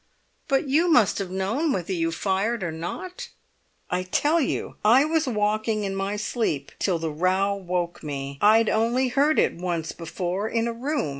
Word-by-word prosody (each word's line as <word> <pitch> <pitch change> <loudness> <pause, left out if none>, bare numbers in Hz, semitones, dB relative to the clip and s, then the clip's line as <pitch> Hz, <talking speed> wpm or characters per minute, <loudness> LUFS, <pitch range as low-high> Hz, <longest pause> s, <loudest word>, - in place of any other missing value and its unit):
"But 275 0 +1
you 310 +6 +3
must 240 - +4
have 195 -2 -3
known 205 - -1
whether 190 -4 -2
you 165 -2 0
fired 195 +5 -1
or 170 - -2
not?" 245 - -6 0.6
"I 180 0 +1
tell 295 - +1
you 270 - -2
I 245 +7 +6
was 320 -1 +1
walking 215 -1 0
in 195 -1 -2
my 195 +1 -2
sleep 210 - -2
till 185 -4 +1
the 160 -1 -3
row 185 +5 +1
woke 180 -3 -3
me. 140 -2 -5
I'd 220 +2 +5
only 235 +4 +1
heard 285 +5 +2
it - - +3
once 170 -2 -3
before, 175 +5 -3
in 230 0 0
a 235 - -2
room. 265 - -2
200 Hz, 175 wpm, -25 LUFS, 175-245 Hz, 0.6 s, I